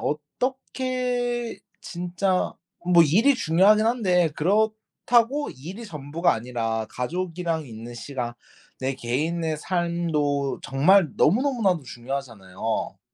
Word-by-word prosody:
어떻게 245 Hz, -, -2 dB, 0.2 s
진짜 180 Hz, +1 st, -1 dB, 0.3 s
뭐 175 Hz, -1 st, +6 dB
일이 215 Hz, -, +4 dB
중요하긴 210 Hz, +2 st, +4 dB
한데 185 Hz, -8 st, +2 dB
그렇다고 220 Hz, -, +1 dB
일이 175 Hz, -, -9 dB
전부가 160 Hz, +1 st, 0 dB
아니라 115 Hz, -1 st, -2 dB
가족이랑 165 Hz, +3 st, -3 dB
있는 115 Hz, 0 st, -9 dB
시간 120 Hz, -1 st, -5 dB, 0.5 s
내 130 Hz, +1 st, -1 dB
개인의 155 Hz, +6 st, -1 dB
삶도 160 Hz, -5 st, -1 dB
정말 165 Hz, +6 st, +4 dB
너무 210 Hz, -, +4 dB
너무나도 220 Hz, -, +1 dB
중요하잖아요. 120 Hz, -6 st, -4 dB
170 Hz, 245 characters per minute, -25 LUFS, 135-215 Hz, 0.5 s, 뭐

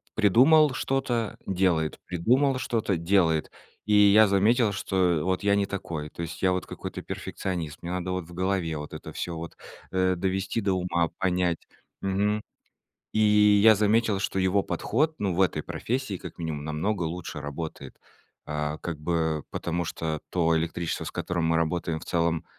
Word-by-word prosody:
придумал 130 Hz, -, +5 dB
что-то- 125 Hz, -5 st, -1 dB
делает, 90 Hz, -5 st, +1 dB
придумал 130 Hz, -, +2 dB
что-то- 110 Hz, -5 st, 0 dB
делает. 85 Hz, -2 st, +2 dB, 0.4 s
И 105 Hz, -, +1 dB
я 105 Hz, +1 st, +7 dB
заметил, 105 Hz, +3 st, +3 dB
что 90 Hz, -4 st, +1 dB
вот 95 Hz, 0 st, 0 dB
я 100 Hz, 0 st, +4 dB
не 100 Hz, 0 st, +2 dB
такой. 85 Hz, -6 st, -5 dB
То 85 Hz, -, -8 dB
есть 85 Hz, -, -7 dB
я 95 Hz, -, +4 dB
вот 90 Hz, 0 st, -1 dB
какой-то -, -, -6 dB
перфекционист, 85 Hz, -5 st, -5 dB
мне 85 Hz, -, -6 dB
надо 90 Hz, 0 st, -2 dB
вот 90 Hz, -2 st, -3 dB
в 85 Hz, -, -13 dB
голове, 90 Hz, -3 st, -1 dB
вот 75 Hz, 0 st, -7 dB
это -, -, -8 dB
всё, 85 Hz, -, -4 dB
вот, 85 Hz, 0 st, -7 dB, 0.4 s
э, 95 Hz, 0 st, +2 dB
довести 95 Hz, +4 st, -1 dB
до 100 Hz, -2 st, +1 dB
ума, 85 Hz, -2 st, 0 dB
понять. 90 Hz, -2 st, +1 dB, 0.4 s
Мгм. 100 Hz, +2 st, 0 dB, 0.7 s
И -, -, -1 dB, 0.5 s
я 110 Hz, -1 st, +9 dB
заметил, 110 Hz, 0 st, +2 dB
что 95 Hz, 0 st, -2 dB
его 95 Hz, +2 st, +2 dB
подход, 150 Hz, +12 st, 0 dB
ну, 100 Hz, -3 st, -1 dB
в 90 Hz, -, -1 dB
этой 90 Hz, -5 st, +2 dB
профессии 125 Hz, -, -3 dB
как -, -, -9 dB
минимум 80 Hz, -3 st, -4 dB
намного 85 Hz, +6 st, -1 dB
лучше 85 Hz, -2 st, -5 dB
работает. 75 Hz, +3 st, -6 dB, 0.5 s
Э, 75 Hz, 0 st, -2 dB
как 85 Hz, -3 st, -4 dB
бы 80 Hz, -1 st, 0 dB
потому, 85 Hz, 0 st, -2 dB
что 80 Hz, -2 st, -3 dB
то 85 Hz, -2 st, +2 dB
электричество, 85 Hz, +1 st, -2 dB
с -, -, -5 dB
которым 90 Hz, -2 st, -2 dB
мы 80 Hz, 0 st, +2 dB
работаем 85 Hz, 0 st, -1 dB
в -, -, -10 dB
целом 85 Hz, -1 st, 0 dB
90 Hz, 165 wpm, -27 LUFS, 80-100 Hz, 0.7 s, я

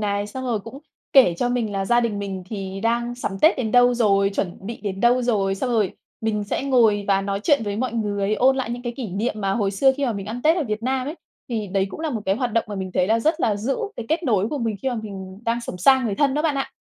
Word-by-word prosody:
này, 205 Hz, -1 st, -1 dB
xong 260 Hz, +5 st, -6 dB
rồi 230 Hz, -4 st, -1 dB
cũng 230 Hz, +6 st, -10 dB, 0.3 s
kể 250 Hz, -11 st, +6 dB
cho 245 Hz, -, +1 dB
mình 235 Hz, -4 st, -1 dB
là 195 Hz, 0 st, -1 dB
gia 240 Hz, +4 st, +3 dB
đình 225 Hz, -4 st, -1 dB
mình 195 Hz, -2 st, -4 dB
thì 195 Hz, -2 st, -5 dB
đang 235 Hz, +1 st, 0 dB
sắm 200 Hz, -5 st, -4 dB
Tết 315 Hz, -, +5 dB
đến 225 Hz, -5 st, -2 dB
đâu 245 Hz, 0 st, +5 dB
rồi, 200 Hz, -4 st, +3 dB
chuẩn 180 Hz, -3 st, -2 dB
bị 230 Hz, +1 st, -6 dB
đến 195 Hz, -2 st, -4 dB
đâu 245 Hz, +2 st, +4 dB
rồi, 200 Hz, -5 st, +1 dB
xong 245 Hz, +6 st, -2 dB
rồi 215 Hz, -5 st, +1 dB, 0.3 s
mình 210 Hz, -2 st, -1 dB
sẽ 205 Hz, -, -2 dB
ngồi 225 Hz, -7 st, +3 dB
và 195 Hz, 0 st, +3 dB
nói 200 Hz, 0 st, -2 dB
chuyện 285 Hz, -7 st, +3 dB
với 205 Hz, -1 st, -3 dB
mọi 250 Hz, +1 st, -2 dB
người, 205 Hz, -2 st, -1 dB
ôn 265 Hz, +4 st, +3 dB
lại 255 Hz, -3 st, -2 dB
những 245 Hz, +1 st, -5 dB
cái 240 Hz, -1 st, -3 dB
kỷ 245 Hz, -6 st, -4 dB
niệm 205 Hz, +5 st, -2 dB
mà 195 Hz, -1 st, 0 dB
hồi 200 Hz, -2 st, 0 dB
xưa 265 Hz, +7 st, +4 dB
khi 285 Hz, -, -1 dB
mà 235 Hz, -, 0 dB
mình 195 Hz, -2 st, -6 dB
ăn 235 Hz, +3 st, -5 dB
Tết 320 Hz, +3 st, +4 dB
ở 330 Hz, -, 0 dB
Việt 215 Hz, -1 st, -3 dB
Nam 260 Hz, +1 st, -1 dB
ấy. 305 Hz, -, -4 dB, 0.3 s
Thì 220 Hz, -3 st, -2 dB
đấy 195 Hz, 0 st, 0 dB
cũng -, -, -8 dB
là 315 Hz, -2 st, -2 dB
một 225 Hz, -4 st, -3 dB
cái 195 Hz, +2 st, +2 dB
hoạt 245 Hz, -3 st, -2 dB
động 230 Hz, -, +2 dB
mà 205 Hz, -, -5 dB
mình 190 Hz, -1 st, -4 dB
thấy 180 Hz, -, +2 dB
là 225 Hz, +2 st, +2 dB
rất 315 Hz, +5 st, +1 dB
là 210 Hz, -7 st, +2 dB
giữ 245 Hz, +6 st, -1 dB, 0.2 s
cái 230 Hz, -, -6 dB
kết 325 Hz, +3 st, 0 dB
nối 215 Hz, -, +1 dB
của 295 Hz, -, -3 dB
mình 225 Hz, -3 st, -1 dB
khi 265 Hz, -, 0 dB
mà 250 Hz, -, -2 dB
mình 195 Hz, -4 st, -7 dB
đang 235 Hz, +1 st, 0 dB
sống 185 Hz, -, -7 dB
xa 265 Hz, +7 st, +5 dB
người 215 Hz, -4 st, -1 dB
thân 280 Hz, +3 st, +2 dB
đó 300 Hz, -, 0 dB
bạn 310 Hz, -3 st, +1 dB
ạ. 270 Hz, -, -3 dB
225 Hz, 295 wpm, -23 LUFS, 200-250 Hz, 0.3 s, kể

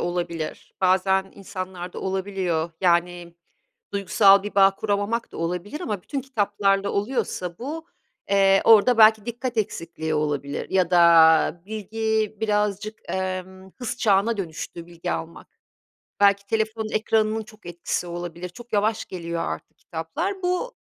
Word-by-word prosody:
olabilir. 170 Hz, -2 st, -4 dB
Bazen 190 Hz, +1 st, +2 dB
insanlarda 185 Hz, -2 st, -7 dB
olabiliyor, 190 Hz, -4 st, -2 dB
yani, 175 Hz, -1 st, +1 dB, 0.6 s
duygusal 200 Hz, 0 st, +5 dB
bir 205 Hz, -, -6 dB
bağ 195 Hz, -1 st, +6 dB
kuramamak 210 Hz, +3 st, -1 dB
da -, -, -9 dB
olabilir 180 Hz, -, -3 dB
ama 210 Hz, -, -3 dB
bütün 275 Hz, -, -4 dB
kitaplarla 205 Hz, -5 st, 0 dB
oluyorsa 200 Hz, -5 st, -2 dB
bu, 315 Hz, +6 st, -6 dB, 0.4 s
eee, 195 Hz, -1 st, +5 dB
orada 225 Hz, +2 st, +6 dB
belki 220 Hz, -1 st, +6 dB
dikkat 240 Hz, +1 st, -4 dB
eksikliği 165 Hz, -6 st, -3 dB
olabilir 145 Hz, -2 st, -2 dB
ya 185 Hz, -2 st, +2 dB
da 170 Hz, -1 st, +5 dB
bilgi 220 Hz, +1 st, -2 dB
birazcık, 210 Hz, 0 st, -1 dB
emm, 190 Hz, 0 st, -4 dB
hız 245 Hz, -2 st, -4 dB
çağına 215 Hz, 0 st, +2 dB
dönüştü 170 Hz, -1 st, -6 dB
bilgi 175 Hz, 0 st, -5 dB
almak. 165 Hz, +1 st, -7 dB, 0.6 s
Belki 200 Hz, 0 st, +4 dB
telefonun 220 Hz, +1 st, -1 dB
ekranının 220 Hz, 0 st, +1 dB
çok 215 Hz, -2 st, -18 dB
etkisi 175 Hz, +1 st, -3 dB
olabilir, 175 Hz, 0 st, -6 dB
çok 240 Hz, +6 st, -14 dB
yavaş 215 Hz, +2 st, +1 dB
geliyor 170 Hz, -2 st, -4 dB
artık 160 Hz, -, -6 dB
kitaplar. 325 Hz, -, -4 dB
Bu 365 Hz, +8 st, -1 dB
195 Hz, 125 wpm, -24 LUFS, 175-220 Hz, 0.6 s, bağ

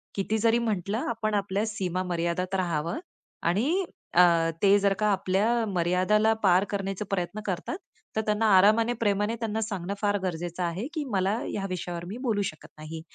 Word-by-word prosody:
किती 210 Hz, +2 st, 0 dB
जरी 230 Hz, +1 st, +3 dB
म्हटलं 210 Hz, -2 st, -1 dB
आपण 220 Hz, -2 st, -2 dB
आपल्या 200 Hz, +1 st, 0 dB
सीमा 185 Hz, -4 st, -2 dB
मर्यादेत 180 Hz, +2 st, -1 dB
राहावं 170 Hz, -, -1 dB, 0.4 s
आणि 275 Hz, -, +1 dB, 0.3 s
अ, 180 Hz, -, +7 dB, 0.4 s
ते 200 Hz, +1 st, +6 dB
जर 200 Hz, 0 st, +3 dB
का 210 Hz, -, +2 dB
आपल्या 205 Hz, +5 st, +1 dB
मर्यादेला 185 Hz, +4 st, +2 dB
पार 185 Hz, 0 st, +5 dB
करण्याचा 195 Hz, 0 st, -3 dB
प्रयत्न 195 Hz, +2 st, -2 dB
करतात, 190 Hz, -, -3 dB, 0.4 s
तर 220 Hz, -, +2 dB
त्यांना 210 Hz, +1 st, +1 dB
आरामाने, 225 Hz, +5 st, +5 dB
प्रेमाने 210 Hz, +1 st, +1 dB, 0.3 s
सांगणं 200 Hz, -3 st, -3 dB
फार 205 Hz, -1 st, +2 dB
गरजेचं 175 Hz, 0 st, -3 dB
आहे 180 Hz, +9 st, -2 dB
की 310 Hz, -3 st, -2 dB
मला 195 Hz, +3 st, +1 dB
ह्या 195 Hz, -1 st, -3 dB
विषयावर 175 Hz, -1 st, -4 dB
मी 210 Hz, +5 st, -6 dB
बोलू 215 Hz, -5 st, +1 dB
शकत 155 Hz, -, -13 dB
नाही 155 Hz, +1 st, -7 dB
195 Hz, 160 wpm, -27 LUFS, 180-215 Hz, 0.4 s, अ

